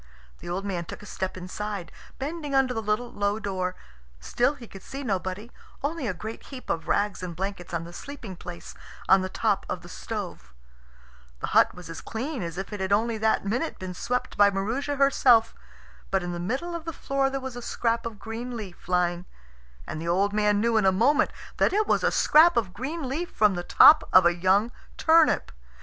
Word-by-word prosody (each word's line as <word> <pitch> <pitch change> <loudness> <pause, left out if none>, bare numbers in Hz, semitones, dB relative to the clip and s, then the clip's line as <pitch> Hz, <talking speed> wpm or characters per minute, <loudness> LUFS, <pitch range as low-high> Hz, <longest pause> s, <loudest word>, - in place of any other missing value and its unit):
The - - -8
old 190 +3 -3
man 180 -4 -3
took 210 - -9
a - - -10
step 190 -2 -4
inside, 190 +1 -5 0.3
bending 295 0 -4
under 265 -2 +3
the 225 - -2
little 220 +3 -1
low 205 +1 0
door. 185 -3 -2 0.4
Still 245 - +1
he 250 -4 -11
could 195 - -11
see 275 +1 -7
nobody, 195 0 -3 0.3
only 290 -2 -2
a - - +1
great 220 +6 -7
heap 260 -3 -6
of 165 - -3
rags 205 -1 0
and 175 -2 -5
blankets 190 -1 -5
on 170 -1 -2
the 170 +1 -10
sleeping 240 -5 -8
place 175 0 -9 0.3
on 190 0 +6
the 185 - -3
top 205 0 0
of - - -3
the - - -11
stove. - - -6 0.8
The - - -3
hut - - +5
was 180 -1 -10
as 165 -1 -7
clean 255 +3 -4
as 170 -1 -5
if 195 +2 -5
it 205 - -5
had 190 0 -2
only 220 +2 +2
that 220 -2 +1
minute 245 +11 -1
been 185 -1 -6
swept 250 +7 -3
by 205 0 +7
Maroosia 225 +9 -2
herself. 255 -5 +4 0.6
But 195 -1 +1
in 175 - -3
the 175 - -4
middle 260 - -3
of 335 -1 -5
the 330 - -4
floor 275 -1 0
there 270 0 -3
was 265 -2 -6
a 245 - -6
scrap 230 0 -1
of 225 -2 -8
green 235 +3 -6
leaf 195 -5 -9
lying, 175 0 +1 0.6
and 155 - -5
the 165 - -5
old 195 +4 +2
man 210 -1 +2
knew 230 +1 +2
in 215 - +3
a - - +6
moment 280 +11 +3 0.3
that - - +3
it 425 +2 +2
was - - +1
a - - +4
scrap 335 +3 +5
of 200 -6 0
green 275 - -4
leaf 320 +7 -3
from 210 -2 +3
the 175 - -3
top 305 - +7
of 185 - +7
a 175 - +5
young 190 +6 +2 0.3
turnip. 325 0 +4
210 Hz, 210 wpm, -26 LUFS, 185-260 Hz, 0.8 s, by